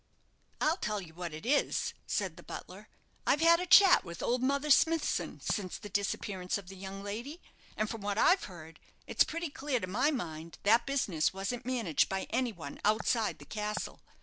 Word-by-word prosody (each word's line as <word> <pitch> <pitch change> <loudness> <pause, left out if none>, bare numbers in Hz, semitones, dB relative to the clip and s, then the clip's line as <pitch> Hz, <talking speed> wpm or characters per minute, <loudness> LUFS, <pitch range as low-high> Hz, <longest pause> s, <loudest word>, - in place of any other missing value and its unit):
"I'll 315 +3 +2
tell 210 - -2
you 170 -4 -10
what 175 0 -5
it 155 +6 -8
is," 285 +4 +1
said - - -1
the - - -12
butler; - - -9 0.4
"I've 295 - +3
had 335 +1 +6
a 360 - -3
chat 390 0 +8
with 170 -1 -7
old 245 +1 +1
Mother 280 +3 +1
Smithson 325 +2 +2
since 190 -4 -2
the 205 - -9
disappearance 195 -2 -2
of 195 -3 -10
the 195 - -9
young 195 +1 -7
lady; 235 +11 -5 0.4
and 215 - 0
from 225 -1 -6
what 205 0 -2
I've 370 - +4
heard, 165 -4 -11 0.3
it's - - +3
pretty 335 -1 -4
clear 275 -3 -1
to 195 - -3
my 215 +11 +1
mind 165 - -5
that 225 +5 +4
business 195 - +1
wasn't 215 +6 -4
managed 230 - +1
by 190 0 -2
any 245 0 +1
one 160 -8 -9
outside 215 +1 +1
the - - -13
castle. 210 0 -4
215 Hz, 190 wpm, -31 LUFS, 190-275 Hz, 0.4 s, chat